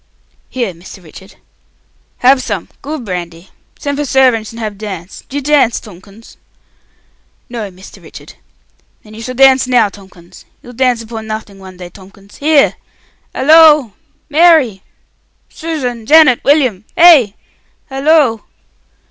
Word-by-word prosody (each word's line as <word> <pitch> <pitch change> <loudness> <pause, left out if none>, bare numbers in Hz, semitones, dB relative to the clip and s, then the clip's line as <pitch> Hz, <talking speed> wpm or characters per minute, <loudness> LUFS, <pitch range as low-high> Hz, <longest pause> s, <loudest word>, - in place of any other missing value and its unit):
"Here, 235 -7 -4
Mr. 175 +2 -14
Richard." 190 +4 -15 0.9
"Have 260 +1 +5
some! 205 -8 -5
Good 290 -3 -6
brandy! 175 -2 -7 0.3
Send 285 0 -4
for - - -1
servantsh 255 -5 +1
and 230 - -11
have 215 -2 -5
dance. 190 -4 -8
D'you 285 +2 -4
dance, 275 -4 +1
Tomkins?" 200 +2 -16 1.1
"No, 230 -4 -6
Mr. 185 +1 -15
Richard." - - -13 0.7
"Then 215 - -16
you 220 - -10
shall 255 +2 -7
dance 265 -1 +4
now, 245 -5 +2
Tomkins. 185 -3 -17 0.2
You'll 245 - -13
dance 245 -2 0
upon 220 -1 -8
nothing 215 -2 -7
one 190 -1 -13
day, 180 -1 -10
Tomkins! 195 +2 -18
Here! 295 -1 +2 0.6
Halloo! 300 -3 +5 0.4
Mary! 300 - +3 0.7
Susan! 255 -9 -5
Janet! 305 -5 +5
William! 255 -9 +1
Hey! 295 - +6 0.6
Halloo!" 270 -4 +2
230 Hz, 125 wpm, -13 LUFS, 200-275 Hz, 1.1 s, Hey